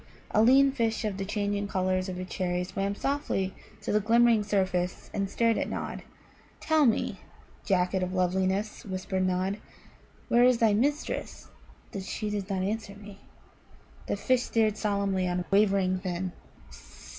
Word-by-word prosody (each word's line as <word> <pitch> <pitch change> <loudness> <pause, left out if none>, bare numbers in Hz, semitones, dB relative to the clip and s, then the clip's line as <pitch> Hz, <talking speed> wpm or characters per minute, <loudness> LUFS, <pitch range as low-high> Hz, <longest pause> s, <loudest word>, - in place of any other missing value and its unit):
A 215 - +4
lean 270 +4 +6
fish 230 -4 -1
of 205 -3 -2
the 195 - -3
changing 205 0 -1
colours 185 -1 0
of 180 - -5
a 185 - -4
cherry 180 -1 -2
swam 195 +2 -2
softly 270 -8 -1 0.3
to - - -2
the 210 - +3
glimmering 230 +1 +4
surface 185 -3 -1
and 200 -1 -1
stared 230 +2 +2
at - - -2
Nod. - - -4 0.6
"Tell 315 -3 +3
me, 225 - 0 0.5
Jacket 185 -1 +1
of 185 0 -2
Loveliness," 190 +3 0
whispered 185 -1 -2
Nod, 185 +3 -1 0.7
"where 240 +1 +4
is 250 -1 +5
thy 225 -2 +3
mistress 285 +8 -1 0.4
that 195 - -4
she 210 +2 -4
does 205 -1 -3
not 190 -1 -1
answer 205 0 -3
me?" 205 -1 -12 0.9
The - - -1
fish 255 -2 +2
stared 220 -3 +1
solemnly 200 -3 0
on 180 0 -1
wavering 195 -2 +3
fin. 185 0 -3
200 Hz, 155 wpm, -28 LUFS, 185-220 Hz, 0.9 s, lean